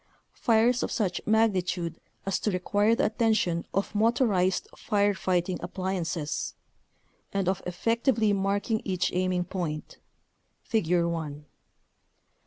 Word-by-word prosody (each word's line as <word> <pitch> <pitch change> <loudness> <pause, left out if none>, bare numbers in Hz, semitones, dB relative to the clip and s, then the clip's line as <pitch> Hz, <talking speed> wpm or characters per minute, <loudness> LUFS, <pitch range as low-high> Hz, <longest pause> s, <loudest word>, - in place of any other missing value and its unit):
fires 235 +2 +3
of - - -1
such 185 -6 -1
magnitude 185 -6 +1 0.2
as 195 - 0
to - - 0
require 205 +4 +2
the 275 - +1
attention 215 -6 +1
of 195 +2 -1
motorized 210 -4 +2
fire 205 -1 +1
fighting 180 -1 0
appliances) 175 -4 -3 0.8
and 195 -2 -1
of 190 0 0
effec 230 +6 -1
tively 225 -6 +3
marking 200 +3 0
each 180 -2 0
aiming 180 0 +1
point 170 -4 -5 0.6
(Figure 175 -5 +1
1). 150 -3 -4
190 Hz, 115 wpm, -28 LUFS, 175-215 Hz, 0.8 s, fires